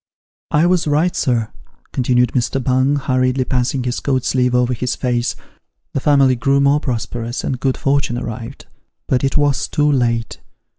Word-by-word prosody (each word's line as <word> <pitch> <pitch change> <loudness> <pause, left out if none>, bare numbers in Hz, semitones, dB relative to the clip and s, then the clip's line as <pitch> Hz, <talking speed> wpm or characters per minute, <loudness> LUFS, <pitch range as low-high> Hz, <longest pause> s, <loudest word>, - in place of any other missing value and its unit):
" - - -
I 150 +3 +3
was 175 -2 +2
right, 155 +5 +1
sir," 115 -4 0 0.4
continued 125 -1 +2
Mr. 130 +1 -1
Bung, 130 +3 +2
hurriedly 130 -2 0
passing 125 0 -1
his 125 0 -2
coat 130 -3 -1
sleeve 125 -1 +1
over 125 0 +2
his 125 +1 -2
face; 120 -2 -1 0.3
" - - -54
the - - 0
family 135 -2 +3
grew 135 +3 +1
more 140 +1 +3
prosperous, 120 -2 -4
and 130 - -2
good 130 -1 0
fortune 135 -3 0
arrived. 115 -1 -7 0.4
But 130 0 +1
it 135 +2 +1
was 145 -2 +1
too 150 0 +1
late. 115 -4 0
130 Hz, 170 wpm, -18 LUFS, 125-140 Hz, 0.4 s, I